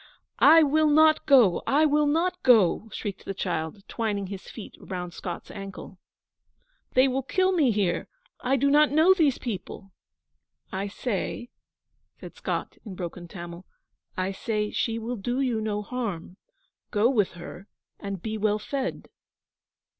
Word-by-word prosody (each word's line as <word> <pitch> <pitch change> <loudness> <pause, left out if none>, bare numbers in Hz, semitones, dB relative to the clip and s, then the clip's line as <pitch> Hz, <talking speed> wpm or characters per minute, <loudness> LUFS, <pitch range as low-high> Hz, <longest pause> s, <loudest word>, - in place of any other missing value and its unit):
'I 320 +2 +8
will 310 +2 +3
not 310 +1 +4
go 245 - +5
I 300 +3 +4
will 300 0 +3
not 330 +5 0
go!' 220 -3 +4
shrieked 200 -3 -6
the 195 - -5
child, 160 +3 -4
twining 210 -4 -2
his 190 0 -8
feet 220 - -9
round 180 -2 -6
Scott's 175 -1 -7
ankle. 195 -2 -9 1.0
'They 255 +1 +6
will 265 +1 0
kill 370 +8 +1
me 315 -8 +3
here. 195 -6 0 0.3
I 260 +2 +1
do 280 +1 +2
not 300 +1 +5
know 315 +6 +5
these 310 -8 +2
people.' 195 -3 -6 0.8
'I 195 +2 -3
say,' 240 +3 -4 0.7
said - - -10
Scott, - - -4
in 205 -5 -8
broken 175 0 -6
Tamil, 175 +1 -9 0.5
'I 185 +1 -1
say, 210 +1 -2
she 225 -1 -1
will 230 +2 -4
do 245 +6 -2
you 245 -5 0
no 210 -1 -2
harm. 205 -8 -5 0.5
Go 210 +2 +3
with 220 -7 +1
her 175 +3 -10 0.3
and 195 -3 -6
be 220 -1 -3
well 210 0 +2
fed.' 265 +5 -4
220 Hz, 150 wpm, -26 LUFS, 195-275 Hz, 1.0 s, I